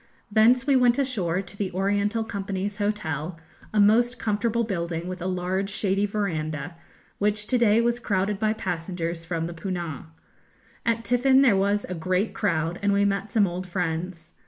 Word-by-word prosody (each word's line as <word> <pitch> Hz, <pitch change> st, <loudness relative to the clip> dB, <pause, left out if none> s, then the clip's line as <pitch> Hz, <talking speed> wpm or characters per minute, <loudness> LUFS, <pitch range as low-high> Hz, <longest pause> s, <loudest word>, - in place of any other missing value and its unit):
Thence 235 Hz, +4 st, +5 dB
we 280 Hz, -, +3 dB
went 245 Hz, -1 st, +4 dB
ashore 195 Hz, -10 st, 0 dB
to 180 Hz, +1 st, -12 dB
the 200 Hz, -2 st, -3 dB
Oriental 205 Hz, +4 st, 0 dB
Company's 200 Hz, -2 st, -4 dB
Hotel, 175 Hz, -6 st, -2 dB, 0.3 s
a 215 Hz, -, +1 dB
most 235 Hz, +4 st, +4 dB
comfortable 230 Hz, +2 st, 0 dB
building, 170 Hz, -5 st, -3 dB
with 185 Hz, -1 st, -6 dB
a 180 Hz, -, -2 dB
large, 185 Hz, +2 st, -1 dB
shady 200 Hz, 0 st, 0 dB
verandah, 165 Hz, -6 st, -3 dB, 0.4 s
which 210 Hz, +1 st, +1 dB
to 250 Hz, -, +1 dB
day 230 Hz, -1 st, +4 dB
was 240 Hz, 0 st, +1 dB
crowded 200 Hz, -2 st, -1 dB
by 215 Hz, 0 st, +2 dB
passengers 170 Hz, -4 st, -4 dB
from 165 Hz, -1 st, -2 dB
the 170 Hz, -, -5 dB
'Poonah.' 170 Hz, -4 st, -5 dB, 0.8 s
At 230 Hz, 0 st, +1 dB
tiffin 260 Hz, +2 st, +4 dB
there 235 Hz, -7 st, +5 dB
was 200 Hz, +2 st, +1 dB
a 185 Hz, -, -5 dB
great 185 Hz, +5 st, -1 dB
crowd, 170 Hz, -3 st, -1 dB
and 200 Hz, 0 st, +2 dB
we 200 Hz, 0 st, +3 dB
met 200 Hz, +1 st, -1 dB
some 210 Hz, -2 st, +4 dB
old 180 Hz, 0 st, -4 dB
friends. 170 Hz, -1 st, -3 dB
200 Hz, 170 wpm, -25 LUFS, 175-215 Hz, 0.8 s, Thence